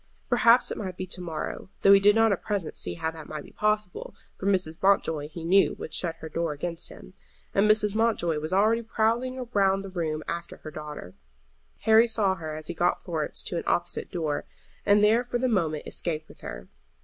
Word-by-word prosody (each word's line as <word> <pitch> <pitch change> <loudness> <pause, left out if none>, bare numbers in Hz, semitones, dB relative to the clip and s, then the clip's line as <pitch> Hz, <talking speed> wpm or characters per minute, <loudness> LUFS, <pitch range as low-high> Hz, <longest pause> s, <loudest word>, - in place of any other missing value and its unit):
Perhaps 240 0 +5
it - - -4
might 185 -4 -5
be 185 - -3
to 180 0 -5
morrow, 165 +1 -5
though 195 - +8
he 200 - +8
did 205 +1 +5
not 225 -1 +4
at 195 - -1
present 200 -6 -3
see - - -4
how 160 -1 -2
that 160 -2 -10
might 155 -1 -5
be - - -15
possible, 210 -3 -1 0.2
for 195 - -3
Mrs. 180 -5 +1
Mountjoy, 165 -6 +2
he 165 +1 -8
knew, 195 +3 +4
would - - -8
shut 170 -2 -1
her 160 - -9
door 165 0 -2
against 165 +3 -5
him. - - -13 0.4
And 205 +2 +3
Mrs. 210 -1 +3
Mountjoy 215 -8 +1
was 155 +2 -4
already 215 +5 +3
prowling 235 +3 -1
round 195 -1 +2
the 195 - -8
room 155 -4 -2
after 170 0 -5
her 155 - -9
daughter. 150 - -8 0.7
Harry 220 +1 +6
saw 210 -4 +2
her 155 -4 -6
as 155 0 -8
he 175 - -3
got 175 +2 0
Florence 160 -4 -1
to 175 - -3
an - - -2
opposite 175 - -1
door, 155 -4 -2 0.4
and 205 0 +5
there 225 +3 +4
for 245 0 -2
the 255 +2 0
moment 165 -10 0
escaped 155 -2 -2
with - - -16
her. - - -8
185 Hz, 210 wpm, -27 LUFS, 160-210 Hz, 0.7 s, though